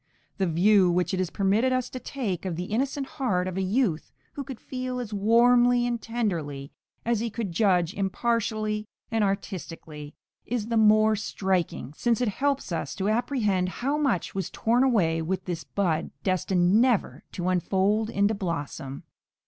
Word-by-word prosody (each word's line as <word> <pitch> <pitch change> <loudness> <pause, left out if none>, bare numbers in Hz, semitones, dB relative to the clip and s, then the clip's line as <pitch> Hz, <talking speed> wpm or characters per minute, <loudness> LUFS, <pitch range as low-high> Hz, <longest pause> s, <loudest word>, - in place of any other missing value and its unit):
The 190 - +2
view 185 +3 +4
which 180 +3 +1
it 185 - 0
is 185 -2 0
permitted 205 +8 +2
us 255 -1 0
to 255 - -5
take 235 -8 -4
of 185 -3 -3
the 175 - -3
innocent 275 +4 -1
heart 195 -10 -1
of 185 - -4
a 190 - -1
youth 190 -4 0 0.2
who 280 - -5
could 265 -4 -8
feel 255 -1 -4
as 230 -4 -5
warmly 240 +4 +4
and 240 -2 -2
tenderly 165 -13 -3 0.3
as 235 -1 +1
he 230 +1 -1
could 220 -3 -4
judge 180 -2 +2
impartially 215 +1 -1 0.2
and 225 -1 +2
artistically, 165 -6 -4 0.3
is 230 -2 -3
the 230 - 0
more 215 0 +5
striking, 190 - -2
since 235 +3 +1
it 245 -3 +1
helps 275 +1 -1
us 155 -5 -3
to 195 +1 -1
apprehend 215 -6 +1
how 270 +9 -2
much 275 - 0
was 190 -1 -3
torn 240 +3 +2
away 175 -11 +2
with 185 +4 -3
this 175 -3 -4
bud, 170 -5 -1
destined 185 +2 +2
never 245 -5 +1
to 180 0 -3
unfold 195 +4 +1
into 200 -1 +2
blossom. 145 -8 -4
205 Hz, 165 wpm, -26 LUFS, 180-235 Hz, 0.3 s, more